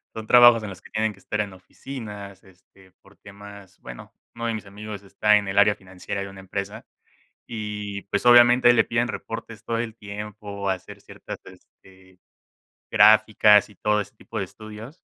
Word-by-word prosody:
Son 110 Hz, -1 st, -7 dB
trabajos 120 Hz, -1 st, +7 dB
en 110 Hz, -, -6 dB
los 95 Hz, -1 st, -11 dB
que -, -, -16 dB
tienen 110 Hz, 0 st, -1 dB
que 100 Hz, -, -20 dB
estar 105 Hz, +2 st, -3 dB
en 100 Hz, -2 st, -6 dB
oficinas, 105 Hz, 0 st, -10 dB
este, 95 Hz, 0 st, -22 dB
por 100 Hz, +1 st, -22 dB
temas, 100 Hz, -1 st, -14 dB
bueno, 60 Hz, -1 st, -11 dB, 0.2 s
uno 115 Hz, 0 st, -5 dB
de 115 Hz, -, -1 dB
mis 105 Hz, -2 st, -7 dB
amigos 105 Hz, 0 st, -8 dB
está 105 Hz, +2 st, +2 dB
en 100 Hz, -1 st, -3 dB
el 95 Hz, -, -4 dB
área 105 Hz, +1 st, +6 dB
financiera 95 Hz, 0 st, -7 dB
de 100 Hz, -, -6 dB
una 95 Hz, 0 st, -12 dB
empresa, 100 Hz, +3 st, -6 dB, 0.6 s
y 105 Hz, -3 st, -6 dB
pues, 100 Hz, -, -3 dB
obviamente 120 Hz, 0 st, +7 dB
le 115 Hz, -, +3 dB
piden 120 Hz, +1 st, -1 dB
reportes 115 Hz, -2 st, -7 dB
todo 115 Hz, -1 st, -2 dB
el 115 Hz, -1 st, -5 dB
tiempo, 105 Hz, -1 st, -7 dB
hacer 95 Hz, -1 st, -5 dB
ciertas, -, -, -10 dB
este, 95 Hz, -1 st, -19 dB, 0.7 s
gráficas 105 Hz, -1 st, +5 dB
y 105 Hz, -, -19 dB
todo 105 Hz, +3 st, 0 dB
ese 105 Hz, -, -7 dB
tipo -, -, -9 dB
de -, -, -2 dB
estudios. 110 Hz, +8 st, -12 dB
105 Hz, 180 wpm, -24 LUFS, 100-110 Hz, 0.7 s, trabajos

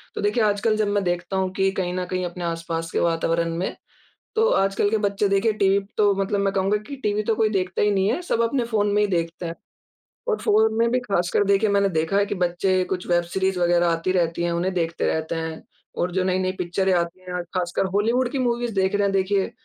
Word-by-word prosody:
तो -, -, -3 dB
देखिए 210 Hz, +2 st, +1 dB
आजकल 210 Hz, +2 st, +1 dB
जब 215 Hz, -1 st, +1 dB
मैं 205 Hz, -1 st, +1 dB
देखता 175 Hz, +2 st, -2 dB
हूँ 190 Hz, -1 st, 0 dB
कि 195 Hz, 0 st, +2 dB
कहीं 180 Hz, -2 st, -2 dB
न 180 Hz, 0 st, -2 dB
कहीं 185 Hz, 0 st, -3 dB
अपने 175 Hz, 0 st, -6 dB
आस-पास 165 Hz, 0 st, -3 dB
के -, -, 0 dB
वातावरण 165 Hz, 0 st, 0 dB
में 185 Hz, -, -2 dB, 0.6 s
तो 450 Hz, +1 st, +4 dB
आजकल 195 Hz, +1 st, +2 dB
के 220 Hz, -, +2 dB
बच्चे 200 Hz, 0 st, 0 dB
देखें 200 Hz, +3 st, +2 dB
टीवी 195 Hz, 0 st, +4 dB, 0.2 s
तो 205 Hz, -1 st, +4 dB
मतलब 200 Hz, 0 st, -1 dB
मैं 195 Hz, 0 st, +1 dB
कहूँगा 195 Hz, +2 st, +2 dB
कि 280 Hz, -, -6 dB
टीवी 210 Hz, 0 st, +1 dB
तो 225 Hz, -, +1 dB
कोई 220 Hz, -1 st, +3 dB
देखता 185 Hz, -3 st, -1 dB
ही 210 Hz, -, +3 dB
नहीं 195 Hz, 0 st, +2 dB
है, 290 Hz, +9 st, -1 dB
सब 235 Hz, -9 st, 0 dB
अपने 235 Hz, +1 st, 0 dB
फ़ोन 215 Hz, -3 st, 0 dB
में 210 Hz, 0 st, +3 dB
ही 205 Hz, -, +1 dB
देखते 170 Hz, -1 st, -2 dB
हैं। 165 Hz, -, -4 dB, 0.8 s
और 435 Hz, -, +1 dB
फ़ोन 220 Hz, +1 st, +3 dB
में 230 Hz, 0 st, +3 dB
भी 255 Hz, -, +2 dB
खासकर 195 Hz, -4 st, 0 dB
देखिए 200 Hz, +2 st, +3 dB
मैंने 200 Hz, -1 st, +3 dB
देखा 160 Hz, +3 st, 0 dB
है 200 Hz, -, +3 dB
कि 205 Hz, -, -3 dB
बच्चे 180 Hz, +1 st, +1 dB
कुछ 180 Hz, 0 st, -4 dB
वेब 175 Hz, 0 st, +2 dB
सीरीज़ 190 Hz, +1 st, -1 dB
वग़ैरह 175 Hz, 0 st, +3 dB
आती 165 Hz, +2 st, 0 dB
रहती 170 Hz, -2 st, 0 dB
है। 170 Hz, -, 0 dB
उन्हें 180 Hz, +2 st, -1 dB
देखते 165 Hz, -2 st, -1 dB
रहते 160 Hz, +1 st, -1 dB
हैं 160 Hz, -1 st, -5 dB, 0.3 s
और 175 Hz, +1 st, 0 dB
जो 185 Hz, +1 st, 0 dB
नई-नई 185 Hz, 0 st, +1 dB
पिक्चरें 185 Hz, +2 st, 0 dB
आती 170 Hz, +1 st, -1 dB
हैं, 180 Hz, -1 st, -4 dB
खासकर 180 Hz, +1 st, 0 dB
हॉलीवुड 235 Hz, +5 st, +2 dB
की 275 Hz, -, -2 dB
मूवीज़ 240 Hz, -2 st, -1 dB
देख 190 Hz, 0 st, +1 dB
रहे 205 Hz, -, +1 dB
हैं 200 Hz, -, +2 dB
देखिए 195 Hz, +3 st, +1 dB
190 Hz, 235 wpm, -23 LUFS, 175-205 Hz, 0.8 s, तो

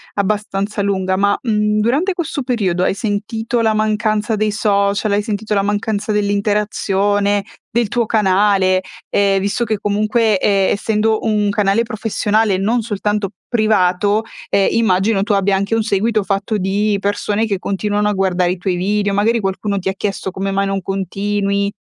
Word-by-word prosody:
abbastanza 205 Hz, 0 st, -1 dB
lunga, 190 Hz, -2 st, 0 dB
ma, 200 Hz, +1 st, +2 dB
mhmm, 210 Hz, -2 st, 0 dB
durante 280 Hz, -, +1 dB
questo 345 Hz, -5 st, -3 dB
periodo 195 Hz, -8 st, 0 dB
hai -, -, +2 dB
sentito 225 Hz, +3 st, -2 dB
la 220 Hz, -1 st, +2 dB
mancanza 215 Hz, 0 st, 0 dB
dei 215 Hz, 0 st, 0 dB
social? 200 Hz, 0 st, +1 dB
Hai 205 Hz, +1 st, +2 dB
sentito 215 Hz, 0 st, -3 dB
la 200 Hz, -, +2 dB
mancanza 205 Hz, +1 st, -1 dB
dell'interazione, 205 Hz, -1 st, 0 dB, 0.3 s
del 235 Hz, -1 st, 0 dB
tuo 235 Hz, +2 st, 0 dB
canale? 195 Hz, -3 st, +2 dB, 0.3 s
Ehm, 195 Hz, -1 st, +2 dB
visto 200 Hz, +5 st, -1 dB
che 220 Hz, -2 st, -1 dB
comunque 210 Hz, +1 st, +1 dB
e 195 Hz, -1 st, +2 dB
essendo 220 Hz, +1 st, +1 dB
un 210 Hz, -2 st, +1 dB
canale 205 Hz, +2 st, +2 dB
professionale 220 Hz, -2 st, 0 dB
e -, -, 0 dB
non 225 Hz, +5 st, +1 dB
soltanto 210 Hz, -2 st, -2 dB, 0.2 s
privato, 210 Hz, -2 st, +2 dB, 0.3 s
ehm, 195 Hz, -, +3 dB
immagino 210 Hz, -2 st, +2 dB
che -, -, +1 dB
tu 210 Hz, 0 st, 0 dB
abbia 195 Hz, 0 st, +2 dB
anche 200 Hz, +3 st, 0 dB
un 225 Hz, -, +1 dB
seguito 215 Hz, +1 st, +1 dB
fatto 200 Hz, +2 st, -1 dB
di 200 Hz, +2 st, 0 dB
persone 205 Hz, +2 st, -1 dB
che 200 Hz, -4 st, -2 dB
continuano 205 Hz, +2 st, -1 dB
a -, -, 0 dB
guardare 185 Hz, -2 st, +1 dB
i 185 Hz, -, -3 dB
tuoi 180 Hz, +1 st, -1 dB
video, 200 Hz, +3 st, 0 dB
magari 220 Hz, +4 st, +2 dB
qualcuno 200 Hz, 0 st, -2 dB
ti 190 Hz, -, -4 dB
ha 190 Hz, -, -1 dB
chiesto: 195 Hz, -1 st, -3 dB
"Come 195 Hz, +2 st, -3 dB
mai 195 Hz, 0 st, 0 dB
non 195 Hz, -1 st, -2 dB
continui?" 200 Hz, +1 st, -1 dB
205 Hz, 165 wpm, -17 LUFS, 195-215 Hz, 0.3 s, ehm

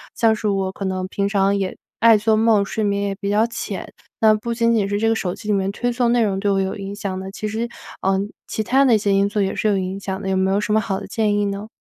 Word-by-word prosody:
像 225 Hz, -1 st, +3 dB
是 215 Hz, 0 st, -3 dB
我 195 Hz, -2 st, 0 dB
可 195 Hz, -, -7 dB
能 185 Hz, -1 st, -2 dB
平 200 Hz, +1 st, -1 dB
常 200 Hz, -1 st, +2 dB
也 195 Hz, -2 st, -2 dB, 0.2 s
爱 230 Hz, -1 st, +7 dB
做 215 Hz, +1 st, +2 dB
梦， 215 Hz, -2 st, +3 dB
睡 215 Hz, +2 st, -3 dB
眠 200 Hz, -1 st, 0 dB
也 200 Hz, -1 st, -1 dB
比 200 Hz, -, -2 dB
较 210 Hz, +2 st, +3 dB
浅， 235 Hz, -, -6 dB, 0.3 s
那 220 Hz, -1 st, +6 dB
不 230 Hz, +2 st, -2 dB
仅 230 Hz, 0 st, +2 dB
仅 205 Hz, -3 st, +1 dB
是 205 Hz, -, 0 dB
这 225 Hz, +2 st, +1 dB
个 225 Hz, -, +3 dB
手 180 Hz, -5 st, -2 dB
机 -, -, -11 dB
里 210 Hz, -, +2 dB
面 195 Hz, -1 st, 0 dB
推 245 Hz, +4 st, -1 dB
送 240 Hz, -1 st, +1 dB
的 245 Hz, -, +3 dB
内 230 Hz, -, +3 dB
容 195 Hz, -2 st, -1 dB
对 205 Hz, +1 st, 0 dB
我 195 Hz, -1 st, +2 dB
有 190 Hz, 0 st, -1 dB
影 200 Hz, 0 st, -6 dB
响 195 Hz, -2 st, -4 dB
的， 190 Hz, 0 st, -6 dB
其 215 Hz, -, -5 dB
实， 225 Hz, +3 st, -3 dB, 0.3 s
呃， 195 Hz, 0 st, +2 dB, 0.3 s
其 220 Hz, -, -2 dB
他 265 Hz, +5 st, +3 dB
的 250 Hz, -4 st, +5 dB
一 -, -, +4 dB
些 200 Hz, -1 st, +1 dB
因 195 Hz, +1 st, +3 dB
素 210 Hz, -, -2 dB
也 195 Hz, -1 st, +1 dB
是 -, -, -1 dB
有 205 Hz, -2 st, +2 dB
影 190 Hz, +1 st, -3 dB
响 190 Hz, -1 st, -4 dB
的， 195 Hz, -2 st, -4 dB
有 190 Hz, -, +1 dB
没 190 Hz, 0 st, +2 dB
有 195 Hz, +1 st, +2 dB
什 210 Hz, 0 st, -1 dB
么 220 Hz, -, +4 dB
好 195 Hz, -4 st, -2 dB
的 200 Hz, -, -8 dB
建 215 Hz, -3 st, 0 dB
议 205 Hz, -, +1 dB
呢？ 200 Hz, +1 st, -4 dB
205 Hz, 330 characters per minute, -21 LUFS, 195-220 Hz, 0.3 s, 爱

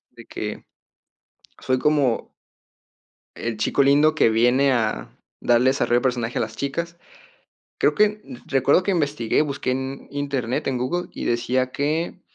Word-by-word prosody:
de -, -, -15 dB
que -, -, -6 dB, 1.0 s
fue 130 Hz, 0 st, 0 dB
como 140 Hz, -5 st, +1 dB, 1.0 s
el 115 Hz, -2 st, -4 dB
chico 125 Hz, +6 st, +2 dB
lindo 145 Hz, +3 st, +4 dB
que 115 Hz, -, +4 dB
viene 125 Hz, +5 st, +3 dB
a 110 Hz, -, -1 dB, 0.3 s
darle 120 Hz, +2 st, +4 dB
desarrollo 120 Hz, -2 st, +2 dB
de -, -, -10 dB
personaje 120 Hz, -2 st, -1 dB
a -, -, +1 dB
las 110 Hz, -1 st, -4 dB
chicas. 170 Hz, +5 st, -4 dB, 0.8 s
Creo -, -, +3 dB
que 210 Hz, 0 st, +2 dB, 0.3 s
recuerdo 135 Hz, +6 st, +3 dB
que 200 Hz, -, 0 dB
investigué, 145 Hz, -10 st, +1 dB
busqué 140 Hz, -3 st, -2 dB
en 135 Hz, +1 st, -4 dB
Internet, 140 Hz, -4 st, -2 dB
en 130 Hz, -2 st, 0 dB
Google, 155 Hz, +9 st, -2 dB
y -, -, -5 dB
decía 130 Hz, +2 st, 0 dB
que: 160 Hz, +5 st, -2 dB
135 Hz, 145 wpm, -23 LUFS, 120-150 Hz, 1.0 s, lindo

